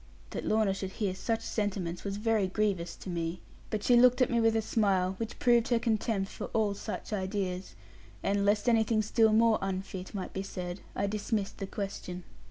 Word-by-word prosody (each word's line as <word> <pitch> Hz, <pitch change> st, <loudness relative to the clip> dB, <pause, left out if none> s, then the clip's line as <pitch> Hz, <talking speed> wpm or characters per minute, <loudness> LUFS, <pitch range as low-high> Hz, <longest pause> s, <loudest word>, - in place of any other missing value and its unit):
That -, -, -4 dB
Lorna 215 Hz, -2 st, +3 dB
should 190 Hz, -1 st, -5 dB
hear 205 Hz, -5 st, -1 dB
such 225 Hz, +4 st, -1 dB
sentiments 190 Hz, -5 st, -2 dB
was 200 Hz, 0 st, -3 dB
very 215 Hz, -2 st, +2 dB
grievous 185 Hz, -4 st, -1 dB
to -, -, -9 dB
me. 170 Hz, +1 st, -2 dB, 0.3 s
But 210 Hz, -1 st, -2 dB
she 245 Hz, -, +5 dB
looked 250 Hz, +1 st, +6 dB
at 255 Hz, -, +3 dB
me 235 Hz, -1 st, +3 dB
with 225 Hz, 0 st, +3 dB
a 225 Hz, -, +3 dB
smile, 190 Hz, -4 st, +2 dB
which 225 Hz, -1 st, -4 dB
proved 240 Hz, -2 st, +4 dB
her 240 Hz, -, +3 dB
contempt 220 Hz, -3 st, 0 dB
for -, -, -5 dB
all 215 Hz, -2 st, +2 dB
such 210 Hz, +1 st, -5 dB
ideas; 190 Hz, -2 st, -2 dB, 0.5 s
and 200 Hz, 0 st, +1 dB
lest 205 Hz, +2 st, +2 dB
anything 225 Hz, -2 st, +3 dB
still 220 Hz, +1 st, +4 dB
more 225 Hz, 0 st, +4 dB
unfit 190 Hz, 0 st, -4 dB
might 190 Hz, -, -4 dB
be 190 Hz, -, -2 dB
said, 180 Hz, -1 st, -5 dB, 0.2 s
I 200 Hz, -, 0 dB
dismissed 205 Hz, 0 st, -2 dB
the 195 Hz, -, -3 dB
question. 185 Hz, -3 st, -5 dB
205 Hz, 190 wpm, -30 LUFS, 190-225 Hz, 0.5 s, looked